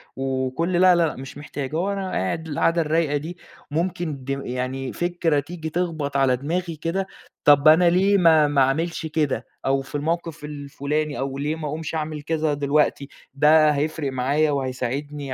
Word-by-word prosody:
وكل 135 Hz, +5 st, -1 dB
لا 185 Hz, -1 st, +7 dB
لا 165 Hz, -3 st, +1 dB
مش 135 Hz, +1 st, -9 dB
محتاج. 145 Hz, -1 st, -5 dB
هو 190 Hz, +5 st, 0 dB
أنا 195 Hz, -2 st, -4 dB
قاعد 160 Hz, -, -2 dB
القعدة 165 Hz, +3 st, +1 dB
الرايقة 155 Hz, -1 st, +1 dB
دي، 165 Hz, +5 st, -7 dB, 0.3 s
ممكن 165 Hz, -3 st, -2 dB
دم 140 Hz, +1 st, -4 dB
يعني 130 Hz, +1 st, -3 dB
فكرة 175 Hz, -3 st, 0 dB
تيجي 160 Hz, +2 st, -6 dB
تخبط 160 Hz, -4 st, -2 dB
على 130 Hz, -2 st, +3 dB
دماغي 165 Hz, +5 st, -3 dB
كده. 170 Hz, +5 st, -2 dB, 0.4 s
طب 145 Hz, 0 st, +6 dB
أنا 170 Hz, +3 st, +7 dB
ليه 195 Hz, +3 st, +3 dB
ما 160 Hz, -4 st, +5 dB
ما 145 Hz, -1 st, +2 dB
أعملش 160 Hz, +6 st, 0 dB
كده 155 Hz, -3 st, -1 dB, 0.2 s
أو 135 Hz, 0 st, +2 dB
في 135 Hz, -, -10 dB
الموقف 165 Hz, +1 st, -2 dB
الفُلاني 150 Hz, +1 st, -3 dB
أو 135 Hz, 0 st, -3 dB
ليه 150 Hz, +3 st, -1 dB
ما 160 Hz, -1 st, -5 dB
أقومش 155 Hz, +2 st, -4 dB
أعمل 155 Hz, -1 st, -3 dB
كذا 155 Hz, 0 st, 0 dB
دلوقتي. 145 Hz, 0 st, +1 dB, 0.3 s
ده 155 Hz, +2 st, +5 dB
هيفرق 150 Hz, -1 st, -1 dB
معايا 140 Hz, +4 st, +1 dB
وهيساعدني 135 Hz, +1 st, -3 dB
150 Hz, 165 wpm, -23 LUFS, 140-165 Hz, 0.4 s, لا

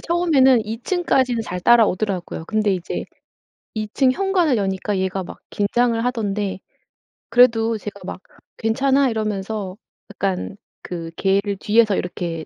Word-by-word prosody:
처음에는 280 Hz, -9 st, +3 dB
2 225 Hz, +2 st, -5 dB
층까지는 260 Hz, -10 st, +1 dB
잘 180 Hz, -4 st, -5 dB
따라오더라고요. 200 Hz, -6 st, +2 dB
근데 215 Hz, -2 st, +1 dB
이제 175 Hz, -2 st, -4 dB, 0.7 s
2 215 Hz, -1 st, -3 dB
층 255 Hz, +4 st, +2 dB
현관을 360 Hz, -7 st, +1 dB
여니까 195 Hz, 0 st, -1 dB
얘가 190 Hz, 0 st, -1 dB
막 -, -, -10 dB
긴장을 230 Hz, +3 st, +1 dB
하던데 205 Hz, -5 st, -2 dB, 0.7 s
그래도 230 Hz, -1 st, +4 dB
제가 200 Hz, -1 st, -8 dB
막 185 Hz, -, -7 dB, 0.4 s
"괜찮아." 270 Hz, +4 st, +2 dB
이러면서 210 Hz, -3 st, -3 dB, 0.4 s
약간 195 Hz, 0 st, -2 dB, 0.3 s
그 165 Hz, -2 st, -6 dB
개를 200 Hz, +1 st, +1 dB
뒤에서 210 Hz, 0 st, +3 dB
이렇게 170 Hz, -3 st, -4 dB
215 Hz, 290 characters per minute, -21 LUFS, 195-245 Hz, 0.7 s, 그래도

